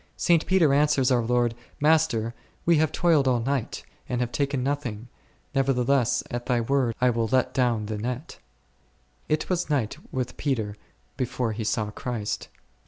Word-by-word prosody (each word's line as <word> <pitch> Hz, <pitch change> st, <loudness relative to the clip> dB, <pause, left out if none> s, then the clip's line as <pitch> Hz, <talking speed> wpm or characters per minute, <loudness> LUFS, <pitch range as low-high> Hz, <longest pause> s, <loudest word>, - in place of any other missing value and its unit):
St. 170 Hz, -2 st, +3 dB
Peter 175 Hz, -7 st, +4 dB
answers 145 Hz, -3 st, +3 dB
our 125 Hz, -2 st, +4 dB
Lord, 120 Hz, 0 st, +1 dB, 0.3 s
Master, 145 Hz, -7 st, +2 dB, 0.3 s
we 170 Hz, -1 st, +5 dB
have 155 Hz, 0 st, +2 dB
toiled 160 Hz, -6 st, +3 dB
all 125 Hz, -1 st, +3 dB
the 115 Hz, -, -4 dB
night, 135 Hz, -5 st, -2 dB, 0.3 s
and 125 Hz, -, -1 dB
have 125 Hz, -1 st, -1 dB
taken 140 Hz, -2 st, -1 dB
nothing; 125 Hz, -5 st, -3 dB, 0.4 s
nevertheless, 135 Hz, -2 st, +2 dB
at 120 Hz, 0 st, -4 dB
Thy 125 Hz, -1 st, +2 dB
word, 120 Hz, -1 st, +1 dB
I 125 Hz, 0 st, +4 dB
will 115 Hz, -1 st, 0 dB
let 130 Hz, -1 st, +2 dB
down 120 Hz, -5 st, +1 dB
the 105 Hz, 0 st, -4 dB
net. 125 Hz, +7 st, -5 dB, 0.9 s
It 155 Hz, 0 st, 0 dB
was 180 Hz, -2 st, -1 dB
night 130 Hz, -7 st, 0 dB
with 125 Hz, -1 st, -3 dB
Peter 110 Hz, -8 st, -1 dB, 0.4 s
before 125 Hz, -3 st, -1 dB
he 110 Hz, +1 st, -4 dB
saw 105 Hz, 0 st, -1 dB
Christ. 110 Hz, -2 st, -4 dB
125 Hz, 165 wpm, -26 LUFS, 115-145 Hz, 0.9 s, we